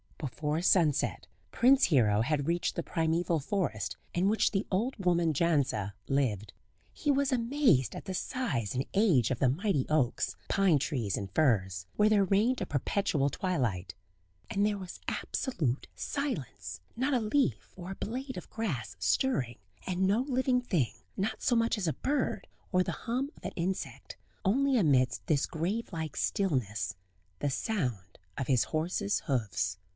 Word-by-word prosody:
Before 150 +3 -2
sunset 160 -7 +2 0.3
Prince 265 +3 +5
Hero 110 - +3
had 145 +3 0
reached 170 +1 0
the - - -1
primeval 165 +1 0
forest 130 - -2 0.2
in 185 +3 +2
which 220 - +3
the 195 -1 -1
old 225 +8 0
woman 170 -3 +3
Jandza 140 - +1
lived. 110 -8 0 0.4
He 295 - 0
was 280 0 +2
amazed 240 - +2
at - - -7
the 190 - -4
size 165 - -2
and 130 +2 0
age 175 - +4
of 130 - 0
the 130 - +4
mighty 155 - 0
oaks, 145 -6 +1
pine 195 -6 +4
trees 120 - -1
and 100 -2 -5
firs, 95 - +2
where 210 +1 +4
there 210 -2 +4
reigned 210 +7 +2
a - - 0
perpetual 145 - 0
twilight. 120 - -2 0.5
And 200 +1 +1
there 210 -1 +1
was 185 -2 -8
absolute 150 - -2
silence 135 - -4
not 260 +4 0
a - - +3
leaf 210 - 0
or 180 0 -7
a - - -5
blade 260 +6 -5
of - - -8
grass 170 - -3
stirring; 120 - +1 0.3
and 185 0 -1
no 205 +5 +3
living 260 -1 +1
thing, 170 - 0 0.2
not 195 +3 -2
so 245 - +3
much 230 -1 +2
as 190 -4 -2
a 155 - +1
bird, 285 +1 -1 0.2
or 185 -2 +3
the - - -3
hum 255 +4 -2
of - - -19
an - - -3
insect; 185 +3 -4 0.3
only 265 +6 +3
amidst 130 - +2
this 150 -5 +2
grave 190 +9 -2
like 160 -4 -4
stillness 115 - 0 0.4
the 145 - 0
sound 125 - -2 0.2
of 135 - -2
his 130 -4 +3
horse's 180 +6 -1
hoofs. 110 - -1
170 Hz, 160 wpm, -30 LUFS, 130-215 Hz, 0.5 s, Prince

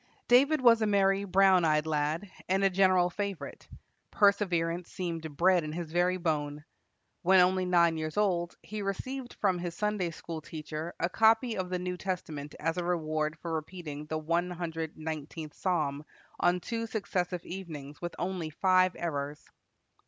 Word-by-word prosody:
David 275 +5 +5
was 230 -2 +6
a 215 - +2
merry, 195 -1 +3
brown 190 -1 +5
eyed 155 -1 +2
lad, 155 +4 -1 0.2
and 190 +1 +2
a 195 - +4
general 185 -1 +4
favorite. 200 -2 -5 0.4
Perseverance 180 -4 +2
seemed 165 -5 -5
bred 180 -1 +4
in 155 - -4
his 165 -1 -5
very 180 +2 +2
bone. 150 -3 -2 0.6
When 190 +1 +5
only 185 +1 +4
nine 170 -2 +3
years 155 +1 -4
old, 175 -5 +1
he 215 -1 -5
received 245 +6 -4
from 190 -3 +1
his 175 -1 -4
Sunday 210 -4 0
school 165 0 -7
teacher 155 +1 -6
a 170 - +2
copy 225 +4 +3
of 185 -1 -3
the 180 - -1
New 180 0 -3
Testament 160 -6 -4
as 165 +3 -1
a - - -1
reward 155 -2 -1
for 165 +1 -5
repeating 155 -2 -5
the 155 - -2
one 170 +3 0
hundred 165 -2 -4
nineteenth 155 0 -6
psalm 150 -6 -1 0.4
on 180 +1 +2
two 230 +2 -3
successive 180 -5 -2
evenings 155 -6 -8
with 175 0 -4
only 175 -3 -3
five 185 +3 +3
errors. 145 -3 -4
175 Hz, 160 wpm, -30 LUFS, 160-190 Hz, 0.6 s, was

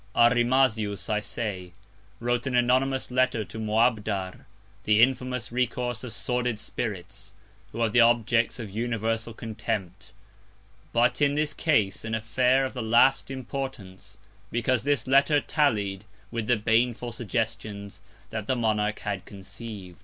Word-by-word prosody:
Arimazius, 120 -4 +3
I 105 - +2
say, 100 -5 -5 0.5
wrote 120 +2 -1
an 130 - -1
anonymous 130 +2 +2
Letter 125 -4 +1
to 100 +5 -9
Moabdar, 110 -4 0 0.4
the 105 0 +3
infamous 125 0 +1
Recourse 125 0 -1
of 125 - -6
sordid 125 -1 -2
Spirits, 100 -2 -6 0.4
who 115 - -5
are 115 - +3
the 120 - +5
Objects 115 0 +3
of 110 -5 -7
universal 115 +1 -2
Contempt; 105 -4 -5 0.8
but 120 +5 +2
in 145 0 +3
this 150 0 0
Case, 110 -12 +1
an 110 0 -2
Affair 125 +4 +2
of 130 - -5
the 125 - -4
last 120 +5 +4
Importance; 120 -7 -6 0.3
because 120 +1 +1
this 140 -4 0
Letter 140 +3 +4
tallied 105 -11 0 0.3
with 115 -2 -3
the 120 - +3
baneful 120 +2 +1
Suggestions 105 -4 -4 0.3
that 110 -2 -4
Monarch 110 -2 0
had 95 -2 -3
conceiv'd. 100 -2 -10
115 Hz, 130 wpm, -26 LUFS, 105-125 Hz, 0.8 s, the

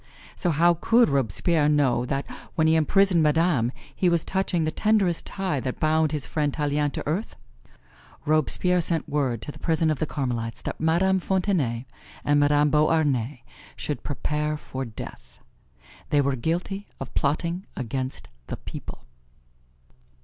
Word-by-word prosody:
So 180 - 0
how 170 +2 +4
could 235 -2 +4
Robespierre 145 - +2
know 135 -5 +2
that 135 +2 -2 0.3
when 160 - +2
he 160 - +4
imprisoned 180 +2 +3
Madame 150 -6 +2 0.2
he 180 - +2
was 170 -2 +1
touching 190 -3 0
the 155 - 0
tenderest 205 -5 +1
tie 190 -7 -2
that 130 0 -4
bound 155 0 +2
his 150 -4 -1
friend 150 -2 -1
Tallien 145 0 0
to - - -4
earth? 175 +9 -2 0.9
Robespierre 160 +4 +2
sent 165 -1 +2
word 135 -6 -1
to - - -5
the - - -14
prison 160 -1 +1
of 150 - -2
the 155 - -1
Carmelites 120 -5 -3
that - - -5
Madame 180 +4 +3
Fontenay 175 - 0 0.4
and 145 0 +3
Madame 145 0 +3
Beauharnais 145 -5 +1 0.3
should 150 - -4
prepare 150 +1 -2
for 135 -2 -6
death 110 -3 -10 0.7
they 145 - +3
were 140 -1 +2
guilty 175 - -2
of 135 - -7
plotting 170 +6 -1
against 130 +2 -4 0.2
the - - -5
people. - - -9
150 Hz, 150 wpm, -25 LUFS, 140-170 Hz, 0.9 s, how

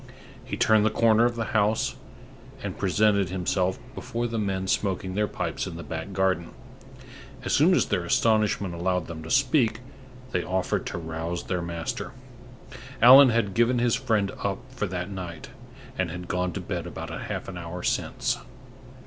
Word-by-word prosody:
He 125 - -5
turned 110 -1 +4
the 110 - +4
corner 115 +1 +4
of 120 0 +1
the 115 -1 -4
house, 105 0 +2 0.7
and - - -4
presented 100 -4 +2
himself 95 0 0 0.2
before 120 +1 -3
the 115 -1 -2
men 95 -2 -1
smoking 95 -1 -1
their 105 +2 +1
pipes - - -3
in - - -6
the 85 - -7
back 80 +4 -5
garden. 95 -3 0 0.9
As - - 0
soon - - +5
as - - +3
their - - -1
astonishment 105 -4 +2
allowed 90 0 -1
them 80 -1 -7
to 80 - -9
speak, 125 - +2 0.5
they 90 - 0
offered 95 0 -1
to - - -4
rouse 80 +1 -4
their 90 -1 -2
master. 85 -1 -4 0.9
Allan 130 +3 +9
had 115 -4 +1
given 120 +3 +3
his 120 -1 +2
friend 110 -7 +1
up 100 -1 0
for 120 -5 -3
that 90 +1 -4
night, 90 -4 -7 0.5
and 95 -2 +1
had 90 +2 -7
gone 90 0 -1
to - - -4
bed - - -4
about - - -7
half - - -5
an 95 - -7
hour 85 +1 -6
since. - - -1
95 Hz, 170 wpm, -26 LUFS, 90-110 Hz, 0.9 s, Allan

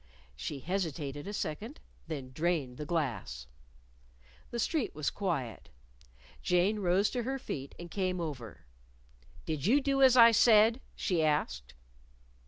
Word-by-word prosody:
She 130 - -5
hesitated 155 -4 -3
a - - -4
second; 210 - -4 0.3
then 140 -5 -5
drained 150 -4 -1
the 150 - -6
glass. 120 - -2 1.0
The 240 - -5
street 250 - -1
was 150 -2 -1
quiet. 160 - -3 0.7
Jane 185 +4 +2
rose 190 +2 +2
to 250 - -1
her 265 +3 -2
feet 140 - -6
and 170 -1 -9
came 185 -2 -1
over. 130 - -6 0.8
"Did 155 0 -2
you 265 +6 +5
do 275 -1 0
as 260 -1 +7
I 235 -1 +9
said?" 225 +2 +5
she 175 -4 0
asked. 150 - -1
175 Hz, 135 wpm, -31 LUFS, 145-215 Hz, 1.0 s, I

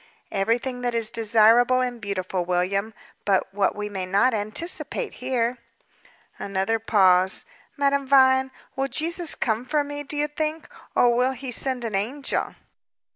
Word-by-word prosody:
"Everything 235 +5 -1
that 245 -1 -2
is 225 -2 +1
desirable 230 +3 +4
and 245 -2 -3
beautiful, 185 -2 -3
William; 185 +4 -1 0.3
but, 195 -1 0
what 200 0 +1
we 210 0 -4
may 195 -2 -4
not 200 +7 +3
anticipate 330 - -2
here." 250 -1 -1 0.8
Another 200 +3 -1
pause. 190 -4 +3 0.3
"Madame 280 -1 +1
Vine, 265 -1 +5 0.3
will 270 0 -1
Jesus 335 +3 0
come 225 -1 -1
for 295 +3 0
me, 290 0 -6
do 290 +1 -6
you 295 0 +1
think, 310 +1 -3 0.3
or 240 -1 +4
will 250 +2 +2
He 260 0 -7
send 255 0 -2
an 225 -2 -4
angel?" 245 +9 -2
240 Hz, 145 wpm, -24 LUFS, 205-270 Hz, 0.8 s, Vine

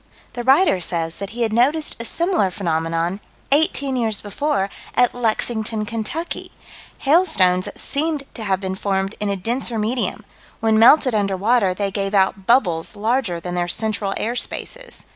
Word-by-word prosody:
The 245 - -4
writer 270 - +4
says 165 -1 -2
that 200 -1 -5
he 235 +2 -2
had 220 -1 -1
noticed 290 +7 +2
a - - -6
similar 340 - +1
phenomenon, 165 0 -1 0.3
eighteen 280 -2 +2
years 225 -4 0
before, 205 0 -1 0.3
at 245 - +3
Lexington, 220 -2 -1
Kentucky. 230 +10 -4 0.5
Hailstones 205 - +3
that - - -8
seemed 300 0 -1
to 225 - -7
have 190 -3 0
been 190 -1 -3
formed 195 +1 -1
in 210 - -1
a 200 - 0
denser 235 +4 -2
medium: 225 +4 -2 0.3
when 220 -1 +2
melted 255 +2 +6
under 200 -3 0
water 205 -2 +2
they 200 0 -2
gave 195 0 -2
out 190 0 +1
bubbles 205 -8 +2
larger 215 -4 0
than 175 +1 -6
their 175 0 -1
central 210 +1 -1
air 235 +2 -2
spaces. - - -3
220 Hz, 160 wpm, -21 LUFS, 190-250 Hz, 0.5 s, melted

